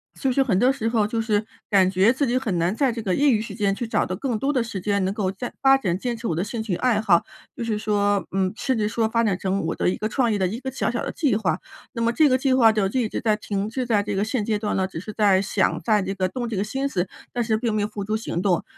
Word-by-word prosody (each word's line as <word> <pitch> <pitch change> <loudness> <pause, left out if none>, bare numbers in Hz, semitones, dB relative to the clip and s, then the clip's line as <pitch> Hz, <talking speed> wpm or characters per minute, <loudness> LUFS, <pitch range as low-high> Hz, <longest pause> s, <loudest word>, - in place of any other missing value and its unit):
所 270 - -1
以 - - +1
是 270 - +3
很 200 -8 +1
多 255 +2 +4
时 225 -4 -3
候 220 -3 +1
就 225 +2 -2
是 215 -2 +1 0.3
感 190 -2 +5
觉 195 +5 +4
自 275 +1 0
己 245 +2 +1
很 200 -9 -1
难 175 +5 +1
在 270 0 +2
这 230 -1 -5
个 190 -4 0
业 285 -1 +4
余 215 - +2
时 225 - -7
间 200 -3 +1
去 230 +3 -4
找 - - +1
到 185 - -3
更 240 +1 -2
多 275 +6 0
的 250 - +1
时 225 -4 -5
间 200 +1 0
能 190 - 0
够 195 -2 -1
再 240 +5 -6
发 270 0 +7
展， 185 -10 -1
坚 240 +4 -3
持 230 +1 -5
我 165 - -1
的 170 - 0
兴 220 +2 -4
趣 215 -5 -2
爱 225 +1 +1
好。 180 -6 +4 0.3
就 - - -4
是 220 -2 -1
说 205 -2 +1
嗯， 190 0 0
甚 260 +1 -1
至 210 -1 +1
说 225 0 0
发 230 0 +1
展 205 -4 +1
成 195 +1 -1
我 - - -1
的 - - +1
一 - - -2
个 215 - -2
创 235 0 +1
业 205 - +1
的 190 - +1
一 220 +7 -4
个 265 - -4
小 265 - -1
小 240 - -2
的 - - -3
计 280 -9 +1
划。 180 -7 0 0.4
那 230 - -4
么 235 +1 +2
这 305 +3 +4
个 255 - +3
计 265 0 +1
划 235 -4 +6
就 215 -2 +1
一 230 0 0
直 - - -3
在 220 -3 +2
停 205 -1 -3
滞 245 +2 -3
在 210 -3 +2
这 205 0 -3
个 195 +1 0
现 220 -1 -1
阶 215 -2 0
段 210 - -2
呢， 190 - +1
只 190 -3 -6
是 205 +5 -7
在 200 -3 +3
想 195 - 0
在 215 -3 +2
这 190 +1 -3
个 185 -1 -1
动 240 +4 -4
这 230 - -4
个 190 - 0
心 270 +6 -2
思， 185 -7 -1 0.3
但 240 - 0
是 220 -1 +1
并 225 0 -1
没 215 - 0
有 205 - 0
付 210 -1 -6
诸 215 +2 -1
行 220 -5 -3
动。 180 -2 +1
215 Hz, 340 characters per minute, -23 LUFS, 195-240 Hz, 0.4 s, 发